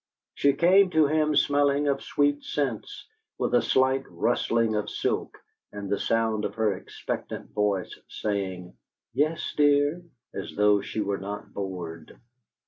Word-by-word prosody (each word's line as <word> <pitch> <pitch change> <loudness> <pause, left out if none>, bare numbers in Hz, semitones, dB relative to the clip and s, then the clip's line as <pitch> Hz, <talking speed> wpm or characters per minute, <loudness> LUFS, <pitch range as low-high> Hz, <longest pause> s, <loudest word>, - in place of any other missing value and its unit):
She 140 0 +3
came 185 +6 +5
to 160 -3 +4
him 155 +1 +2
smelling 145 0 +3
of 140 -1 +1
sweet 145 0 +1
scents, 135 -7 -3 0.3
with - - -1
a - - +5
slight 130 +1 +2
rustling 115 -2 +1
of 105 0 -1
silk, - - -2 0.3
and 100 -1 -6
the 100 - +1
sound 110 -2 0
of - - -3
her 110 -2 +1
expectant 90 - -6
voice, 100 -3 -1
saying, 95 -4 -3 0.4
"Yes, 155 +3 0
dear?" 145 +3 +3 0.3
as - - -6
though 105 -1 +4
she 110 - -4
were 100 -1 -1
not 100 +2 -7
bored. 90 -5 -6
115 Hz, 140 wpm, -26 LUFS, 100-145 Hz, 0.4 s, came